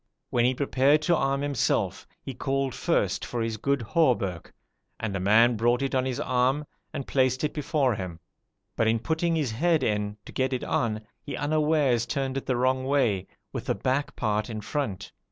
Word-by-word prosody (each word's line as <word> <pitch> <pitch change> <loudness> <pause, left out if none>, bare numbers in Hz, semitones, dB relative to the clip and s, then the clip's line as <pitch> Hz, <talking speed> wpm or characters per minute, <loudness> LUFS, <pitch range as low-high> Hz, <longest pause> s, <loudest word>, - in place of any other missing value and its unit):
When 120 -1 +3
he 130 +1 +2
prepared 140 +2 +3
to 170 - +3
arm 135 -2 0
himself, 140 -4 0 0.2
he 135 - -5
called 135 +1 -1
first - - 0
for 120 -2 -2
his 115 -1 -2
good 140 +3 0
hauberk, 110 - +1 0.5
and 105 -3 -3
a - - -1
man 110 +5 +5
brought 120 +4 +2
it 135 - -2
on 130 -1 +2
his 130 0 -2
arm, 130 +2 +1 0.3
and 140 - -4
placed 130 0 +1
it 150 - 0
before 145 -3 +1
him, 90 -5 -5 0.6
but 115 - +2
in 115 +1 +3
putting 160 +7 0
his 145 -7 0
head 160 +5 +2
in, 105 -2 -1
to - - -10
get 130 0 0
it 125 - -2
on, 110 -2 0 0.2
he 145 - -6
unawares 150 -5 +2
turned 135 -1 -2
it 135 - -4
the 130 -2 +1
wrong 130 +1 +1
way, 120 -9 +1 0.3
with - - -5
the - - +1
back 135 +3 -1
part 105 +1 -1
in 110 -2 -4
front. 100 -7 -3
130 Hz, 190 wpm, -27 LUFS, 115-140 Hz, 0.6 s, man